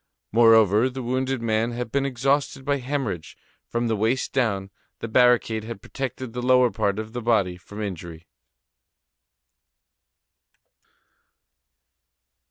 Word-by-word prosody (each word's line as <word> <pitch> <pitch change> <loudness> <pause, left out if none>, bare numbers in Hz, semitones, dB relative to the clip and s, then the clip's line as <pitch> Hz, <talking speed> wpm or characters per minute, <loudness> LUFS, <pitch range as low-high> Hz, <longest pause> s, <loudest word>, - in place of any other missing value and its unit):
Moreover, 115 0 +5
the 130 0 -6
wounded 130 0 -1
man 115 +1 0
had 120 -1 -5
been 140 0 +1
exhausted 135 +1 0
by 145 0 +1
hemorrhage. 125 - -4 0.3
From 120 0 -2
the 115 - +1
waist 115 +5 0
down, 100 -7 0 0.3
the - - -5
barricade 120 -2 +3
had 115 -2 -7
protected 130 +1 -6
the 125 - -4
lower 125 -1 +4
part 100 -3 -1
of 110 +1 -6
the 120 - -4
body 105 -6 +1
from 105 +4 -8
injury. 85 -4 -7
115 Hz, 120 wpm, -24 LUFS, 110-130 Hz, 0.3 s, Moreover